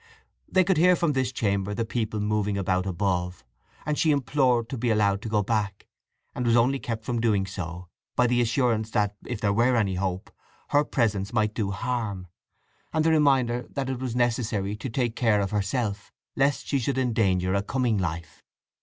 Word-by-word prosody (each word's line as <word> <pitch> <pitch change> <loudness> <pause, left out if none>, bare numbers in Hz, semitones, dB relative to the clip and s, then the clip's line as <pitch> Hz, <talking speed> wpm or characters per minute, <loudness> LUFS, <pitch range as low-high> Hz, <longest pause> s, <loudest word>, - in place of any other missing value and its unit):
They 185 - +5
could 185 -1 +1
hear 180 +3 +5
from 170 -3 +1
this 130 -1 0
chamber 100 -3 -1
the 115 - -1
people 110 -2 -2
moving 105 -1 0
about 95 -1 0
above, 90 -4 -2 0.4
and 150 -1 -1
she 160 - +3
implored 130 -4 +2
to 130 - -4
be 120 0 0
allowed 100 -2 +2
to 115 - -5
go 105 -1 +1
back, 100 -2 -2 0.5
and 125 - -3
was 120 -1 +3
only 125 +3 +3
kept 115 -3 -5
from 120 -2 -1
doing 105 -4 +2
so 90 -2 -6 0.3
by 125 - +3
the 120 0 +2
assurance 115 -2 +1
that, 105 -1 0
if 120 -4 -4
there 100 -1 +1
were 120 +4 +3
any 105 -5 +1
hope, 95 0 -3 0.4
her 145 +1 +4
presence 105 -7 -1
might 110 -2 +1
do 105 -3 -2
harm, 105 -3 -3 0.7
and 155 0 +1
the 165 - +4
reminder 135 -6 +2
that 135 -1 -3
it 130 - -4
was 125 -2 -3
necessary 115 -5 0
to 120 +5 -6
take 120 -1 -1
care 110 -4 +2
of 100 -1 -1
herself 105 0 -2 0.2
lest 140 +1 +1
she 140 - 0
should 130 +2 -1
endanger 100 -8 +1
a 100 - +2
coming 120 0 0
life. 85 -3 -5
110 Hz, 190 wpm, -26 LUFS, 100-125 Hz, 0.7 s, They